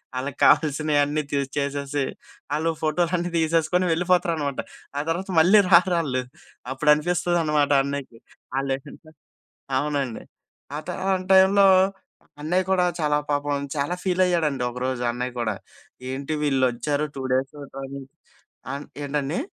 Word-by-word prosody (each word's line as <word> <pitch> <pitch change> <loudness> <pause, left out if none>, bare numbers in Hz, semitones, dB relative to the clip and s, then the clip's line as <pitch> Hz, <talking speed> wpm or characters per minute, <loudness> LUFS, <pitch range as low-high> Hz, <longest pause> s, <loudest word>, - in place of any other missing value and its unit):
వాళ్ళకి 135 +2 -4
కావాల్సినవి 150 -1 +3
అన్నీ 150 +1 -1 0.3
చేసేసి 140 0 -1 0.5
వాళ్ళు 160 +2 +1
ఫోటోలన్నీ 175 +2 0
తీసేసుకొని 165 +2 +2
వెళ్ళిపోతారనమాట, 165 -5 0 0.4
ఆ - - +1
తర్వాత 185 +4 -3
మళ్ళీ 190 +6 +7
రారు 180 +1 +6
ఆల్లు. 130 -5 -2 0.5
అప్పుడు 150 +3 +3
అనిపిస్తుందనమాట 155 -2 +1
అన్నయ్యకి 140 -4 -5 0.4
ఆ‌లేంటో, 135 +3 -5 0.7
అవునండి. 140 -4 -2 0.5
ఆత 155 - -8 0.2
ఆ - - +2 0.2
టైంలో 190 +1 +6 0.8
అన్నయ్య 175 +5 +1
కూడా 190 -1 +3 0.2
చాలా 150 -1 +2
పాపం 145 -1 -1
చాలా 145 +4 -1
ఫీల్ 185 -1 +1
అయ్యాడండి 155 -7 0
ఒకరోజు 125 0 -3
అన్నయ్య 125 +1 -4
కూడా 110 -3 -1 0.5
ఏంటి 135 +3 -3
వీళ్ళు 135 -3 +1
వచ్చారు 145 +5 -1
2 135 - -5
డేస్ 130 +1 0
ఫోటో 135 -1 -9
తీసి 135 -1 -9 0.6
ఆహ్, 140 +1 -5 0.2
ఏంటండి? 145 +2 -2
150 Hz, 125 wpm, -24 LUFS, 135-170 Hz, 0.8 s, మళ్ళీ